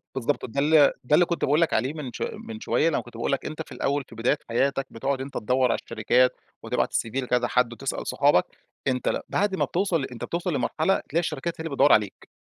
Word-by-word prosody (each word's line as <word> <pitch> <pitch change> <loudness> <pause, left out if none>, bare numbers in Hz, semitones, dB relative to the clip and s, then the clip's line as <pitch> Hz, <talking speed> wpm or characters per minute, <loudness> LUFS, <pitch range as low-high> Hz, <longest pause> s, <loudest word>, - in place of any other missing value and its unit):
بالضبط، 135 +3 -1
ده 135 +3 -4
ال 150 -1 +5
ده 135 - -1
اللي 175 - +5
كنت 170 - -1
باقول 150 +4 +3
لك 165 - +2
عليه 130 +7 +1
من 145 -6 -6
ش - - -8 0.3
من 225 -1 -7
شوية، 165 - +1
لمّا - - 0
كنت 120 -1 -13
باقول 120 - -1
لك 140 - -1
أنت 155 +1 -5
في - - -9
الأول، 140 0 -1
في 115 - -13
بداية 120 +6 +1
حياتك، 135 +3 0
بتقعد 130 +3 -2
أنت 135 +1 -7
تدوّر 125 +2 +2
على - - 0
الشركات 125 +4 +3 0.3
وتبعت - - -1
الCV - - +1 0.2
لكذا 125 -1 +1
حد، 125 -2 +1
وتسأل - - -4
صحابك. - - +3 0.4
أنت 125 -1 0
ل - - 0
بعد 200 -1 +1
ما - - +1
بتوصل 175 -5 0
أنت 120 -2 -9
بتوصل 170 0 -2
لمرحلة، 155 +7 +1
تلاقي 165 - +1
الشركات 165 0 -2
هي - - -5
اللي - - -3
بتدوّر 145 - +6
عليك، 105 -3 0
140 Hz, 230 wpm, -25 LUFS, 125-160 Hz, 0.4 s, بتدوّر